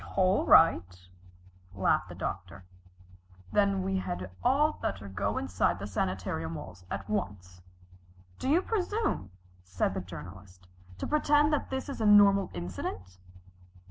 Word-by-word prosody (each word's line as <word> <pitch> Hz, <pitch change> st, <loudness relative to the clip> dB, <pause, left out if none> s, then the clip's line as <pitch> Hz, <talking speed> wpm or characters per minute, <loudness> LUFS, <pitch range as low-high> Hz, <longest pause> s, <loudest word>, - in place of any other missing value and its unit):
"All 190 Hz, +1 st, +2 dB
right," 90 Hz, -, +4 dB, 0.7 s
laughed 95 Hz, -, +1 dB
the -, -, -9 dB
Doctor, 90 Hz, -1 st, -6 dB, 0.9 s
"then 200 Hz, -2 st, +2 dB
we 190 Hz, 0 st, -1 dB
had 90 Hz, -, -5 dB
all 290 Hz, +5 st, +2 dB
better 100 Hz, +1 st, -3 dB
go 100 Hz, +1 st, -2 dB
inside 90 Hz, 0 st, 0 dB
the 100 Hz, -, -6 dB
sanitarium 90 Hz, -4 st, -3 dB
walls 90 Hz, +2 st, -9 dB
at 100 Hz, 0 st, -5 dB
once." 90 Hz, -4 st, -4 dB, 0.8 s
"Do 260 Hz, -, -2 dB
you 340 Hz, +6 st, +3 dB
presume," 415 Hz, -, -1 dB, 0.3 s
said 90 Hz, 0 st, -1 dB
the 95 Hz, -, -3 dB
Journalist, 90 Hz, +2 st, -11 dB, 0.3 s
"to -, -, -4 dB
pretend 295 Hz, 0 st, +3 dB
that 295 Hz, -, -1 dB
this 265 Hz, +1 st, -4 dB
is 275 Hz, -5 st, -6 dB
a 215 Hz, -, +2 dB
normal 200 Hz, -2 st, +6 dB
incident?" 90 Hz, +1 st, -6 dB
100 Hz, 135 wpm, -29 LUFS, -, 0.9 s, normal